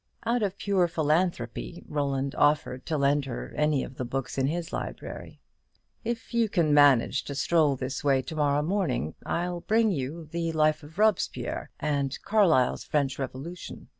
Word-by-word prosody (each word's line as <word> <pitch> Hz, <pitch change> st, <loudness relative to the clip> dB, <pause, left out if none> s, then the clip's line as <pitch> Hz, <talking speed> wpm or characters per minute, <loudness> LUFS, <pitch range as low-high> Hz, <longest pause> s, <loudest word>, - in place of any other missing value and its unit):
Out 240 Hz, +1 st, +1 dB
of 200 Hz, -2 st, -1 dB
pure 195 Hz, -4 st, +2 dB
philanthropy 155 Hz, -, -1 dB
Roland 140 Hz, -2 st, -1 dB
offered 145 Hz, -3 st, +1 dB
to 160 Hz, -, 0 dB
lend 140 Hz, 0 st, +2 dB
her 125 Hz, -3 st, -6 dB
any 150 Hz, -2 st, +2 dB
of 130 Hz, -, -9 dB
the -, -, -2 dB
books 130 Hz, +1 st, -3 dB
in 135 Hz, 0 st, +1 dB
his 165 Hz, +2 st, -3 dB
library. -, -, -6 dB, 0.6 s
"If 235 Hz, +1 st, -4 dB
you 230 Hz, -2 st, +2 dB
can 165 Hz, -7 st, +2 dB
manage 140 Hz, -2 st, +5 dB
to 140 Hz, -, -5 dB
stroll 150 Hz, 0 st, +3 dB
this 130 Hz, +1 st, -4 dB
way 135 Hz, -2 st, +3 dB
to 155 Hz, -, -7 dB
morrow 145 Hz, -1 st, +2 dB
morning, 155 Hz, -, -1 dB
I'll 175 Hz, +1 st, -1 dB
bring 220 Hz, +2 st, +2 dB
you 155 Hz, +1 st, -4 dB
the 165 Hz, +1 st, -3 dB
'Life 155 Hz, 0 st, +2 dB
of 155 Hz, +3 st, -14 dB
Robespierre,' 215 Hz, -1 st, 0 dB
and 140 Hz, -3 st, -1 dB
Carlyle's 180 Hz, -, +3 dB
'French 140 Hz, -2 st, -1 dB
Revolution.' 140 Hz, +6 st, -7 dB
150 Hz, 165 wpm, -27 LUFS, 135-175 Hz, 0.6 s, manage